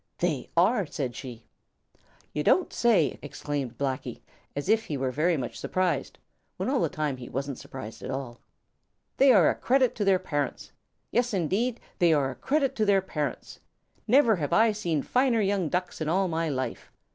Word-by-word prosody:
"They 165 -6 -1
are," 195 +2 +3
said 130 -5 -4
she. 120 -4 -8 0.9
"You 150 - -1
don't 370 - +3
say 205 - +3
so!" - - -13
exclaimed 140 -3 -4
Blacky, 135 -2 -3 0.3
as 145 +3 -3
if 220 +2 +3
he 145 - -3
were 130 -1 -1
very 160 +5 +1
much 125 -3 -5
surprised, 185 -1 -1 0.4
when - - -1
all 275 - +2
the - - +1
time 150 -6 -2
he 125 - -9
wasn't 135 0 -4
surprised 130 -4 -9
at - - -6
all. 130 -3 -5 0.8
"They 270 0 +6
are 190 -9 +6
a - - +4
credit 260 -1 +2
to 210 - 0
their 195 -1 +4
parents. 145 -7 -3 0.4
Yes, 240 -2 +1
indeed, 210 +8 0 0.2
they 170 -2 +5
are 140 -3 +1
a - - -9
credit 275 -2 0
to 215 - +2
their 200 -2 +4
parents. 150 -8 -4 0.5
Never 235 -3 +5
have 145 -4 -2
I 225 0 +5
seen 175 -9 -1
finer 250 -2 +2
young 195 -5 +1
Ducks 180 0 -3
in 155 - -1
all 190 +3 +2
my 165 -1 -1
life. 130 -4 -4
170 Hz, 185 wpm, -27 LUFS, 140-215 Hz, 0.9 s, They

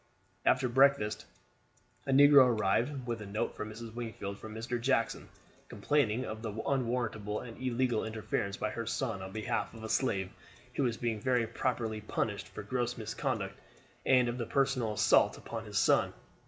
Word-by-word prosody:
After 130 0 +4
breakfast 130 -4 +3 0.8
a - - +1
negro 140 -1 +8
arrived 120 +7 +1
with 115 -2 -3
a 105 - -7
note 105 +2 -2
for - - -4
Mrs. 110 +1 -8
Wingfield 110 -4 -5
from 110 0 -8
Mr. 115 +1 -3
Jackson, 120 -2 0 0.4
complaining 120 +2 +1
of 110 0 -6
the 110 -2 -4
unwarrantable 115 -3 -1
and 115 -2 -9
illegal 125 -2 +1
interference 110 -2 -2
by 110 - -2
her 115 -1 -4
son 115 -8 -2
on 95 0 -7
behalf 110 +2 -2
of 110 - -10
a 110 - -5
slave 95 -9 0 0.4
who - - -1
was 120 -4 +1
being 115 -3 -1
very 125 -2 +2
properly 115 -2 -2
punished 105 -1 -2
for 95 - -8
gross 120 +3 -2
misconduct; 110 -1 -3 0.4
and 125 -2 +4
of 120 +1 -3
the 120 - -2
personal 135 -5 +1
assault - - +4
upon - - -6
his - - -4
son. - - +4
115 Hz, 170 wpm, -32 LUFS, 110-125 Hz, 0.8 s, negro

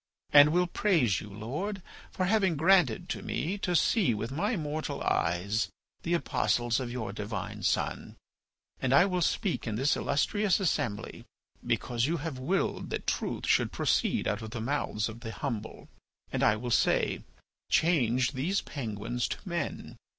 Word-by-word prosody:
And 145 +1 +9
will 180 +2 +3
praise 165 - +2
you, 105 - -9
Lord, 150 - -4 0.3
for 185 - -1
having 190 -3 +2
granted 180 +2 +3
to - - -3
me 190 +6 -2
to 180 -3 -1
see 170 - +3
with 110 +4 -4
my 205 - 0
mortal 155 -2 -3
eyes 90 +7 0 0.3
the 170 +1 0
Apostles 120 -7 +1
of 125 -2 -4
your 110 -5 -4
divine 105 0 -5
Son. - - -1 0.7
And 130 +1 +3
I 160 - +7
will 180 -2 -1
speak 175 - 0
in 110 - -2
this 135 +5 +2
illustrious 195 +7 +1
assembly 120 - -2 0.4
because 120 +1 0
you 170 +2 0
have 150 -3 -5
willed 180 +9 -1
that - - -4
truth - - -2
should - - +2
proceed - - +1
out 105 +1 -1
of 110 - -6
the 120 +1 -5
mouths 115 -3 -1
of 110 +1 -8
the 115 -2 -6
humble, 115 -7 -5 0.5
and - - 0
I 105 - +4
will 120 +3 -4
say: - - +2 0.5
'Change 130 -7 +2
these 155 +9 0
penguins 120 -2 -3
to - - -4
men. 170 -1 -4
135 Hz, 160 wpm, -29 LUFS, 115-175 Hz, 0.7 s, And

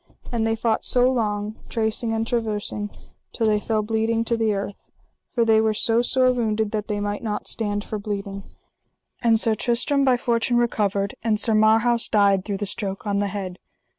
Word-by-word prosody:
And 225 -2 0
they 225 - +1
fought 225 0 0
so 250 0 +4
long, 210 -3 -2
tracing 225 0 0
and 225 0 0
traversing, 210 -3 -2 0.4
till 230 - -1
they 210 -1 +3
fell 215 0 -1
bleeding 225 +1 0
to 235 - +1
the 225 -1 +1
earth; 200 0 -5 0.4
for 235 -2 +1
they 220 -1 +4
were 220 -1 +1
so 230 +2 +2
sore 255 +1 +3
wounded 220 -3 0
that 210 -1 -3
they 210 -1 -2
might 205 0 -3
not 210 -3 -3
stand 205 -2 0
for 215 - -5
bleeding. 200 -1 -4 0.8
And 230 -2 +3
Sir 225 0 +1
Tristram 245 +5 +1
by 260 -2 +4
fortune 240 0 +1
recovered, 205 -4 0
and 220 -2 +1
Sir 225 - +1
Marhaus 225 +2 +3
died 200 -3 +3
through 200 -2 -2
the 205 - -3
stroke 195 0 -4
on 200 -1 0
the 205 - 0
head. 190 -2 -5
220 Hz, 190 wpm, -23 LUFS, 205-230 Hz, 0.8 s, so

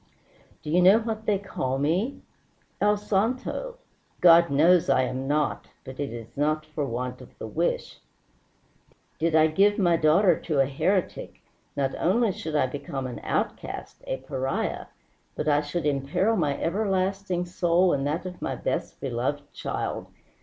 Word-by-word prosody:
Do 150 - -4
you 180 +2 +4
know 190 +4 +7
what 220 -1 -4
they 205 -2 +3
call 135 -10 -3
me? 175 - 0 0.6
El 210 0 +4
santo. 245 - -1 0.4
God 170 -1 +7
knows 160 +4 +4
I 130 -1 +4
am 130 +1 -3
not, 150 0 0 0.2
but 130 +1 -10
it 140 -1 -2
is 115 -1 -9
not 155 +2 0
for 155 -2 -3
want 125 +2 -4
of 125 - -15
the - - -6
wish. 160 +10 -2 1.2
Did 165 0 +1
I 155 0 +6
give 195 +6 +3
my 175 -4 +3
daughter 165 +3 +4
to 155 -5 -1
a 135 - +5
heretic, 180 +8 -2 0.3
not 135 -1 0
only 215 +4 +2
should 160 -3 -5
I 150 - +3
become 135 0 -5
an 125 -2 -5
outcast, - - -4
a 130 - -1
pariah, 135 0 -3 0.5
but 150 - -3
I 145 -1 +4
should 150 +2 -3
imperil 145 +10 +1
my 150 -7 0
everlasting 190 -1 -1
soul 175 0 +2
and 140 0 0
that 165 +5 -2
of 180 -1 -7
my - - -2
best - - -3
beloved 135 +3 -3
child. - - -4
160 Hz, 160 wpm, -26 LUFS, 140-190 Hz, 1.2 s, know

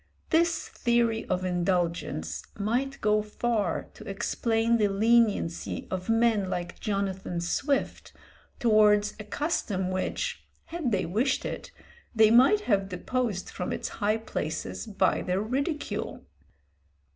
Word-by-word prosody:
This 335 +1 +2
theory 235 -2 +1
of 185 0 -1
indulgence 175 - -1 0.2
might 245 +7 -1
go 210 0 +3
far 210 -3 -1
to - - -10
explain 225 +3 +1
the 210 -2 +3
leniency 210 -4 +1
of 185 +2 -4
men 225 -4 +3
like 175 -1 -4
Jonathan 195 -3 -2
Swift 270 - -1 0.5
towards 210 -3 +4
a - - -5
custom 205 - -1
which, 475 - -2 0.2
had 325 -7 -3
they 195 -3 +1
wished 230 +10 0
it, - - -5 0.4
they 220 -1 +6
might 265 - +6
have 195 - +1
deposed 200 +2 -2
from 180 - -4
its - - -3
high 210 +2 +2
places 215 -4 -4
by 195 -3 +1
their 185 +1 0
ridicule. 275 - -3
215 Hz, 120 wpm, -28 LUFS, 190-235 Hz, 0.5 s, they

